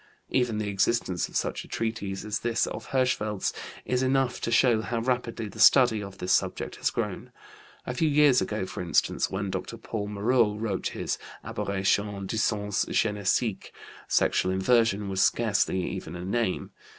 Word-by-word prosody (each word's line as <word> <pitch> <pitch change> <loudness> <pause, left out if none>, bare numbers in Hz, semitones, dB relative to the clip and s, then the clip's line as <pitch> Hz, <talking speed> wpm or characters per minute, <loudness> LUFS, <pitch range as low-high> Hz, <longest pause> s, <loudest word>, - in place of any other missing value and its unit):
Even 125 -4 +1
the 105 -1 -2
existence 100 -2 0
of - - -14
such - - -1
a - - -14
treatise 105 -4 -3
as 105 0 -2
this 115 -1 +1
of - - -6
Hirschfeld's 110 -6 0 0.3
is 125 0 0
enough 130 -1 +1
to - - -2
show 115 -1 +4
how 115 +1 -3
rapidly 120 -2 -2
the 100 - -11
study 120 -5 +6
of 100 -1 -8
this 90 +1 0
subject - - -1
has - - +1
grown. - - -4 0.5
A 125 - -3
few 155 +5 +1
years 145 -3 +5
ago 105 -2 -2
for - - -6
instance, 85 -4 +1
when 95 0 -3
Dr. - - -5
Paul 105 -2 -4
Moreau 105 +1 +2
wrote 105 -3 -2
his - - -2 0.2
Aberrations 100 -2 -1
du 110 - -2
Sens 105 -2 0
Génésique 105 0 0 0.4
sexual 95 - +2
inversion 105 +1 +2
was 95 -1 0
scarcely 100 -5 +2
even 80 - -6
a 90 +1 -6
name. 110 -1 -1
105 Hz, 165 wpm, -27 LUFS, 100-120 Hz, 0.5 s, study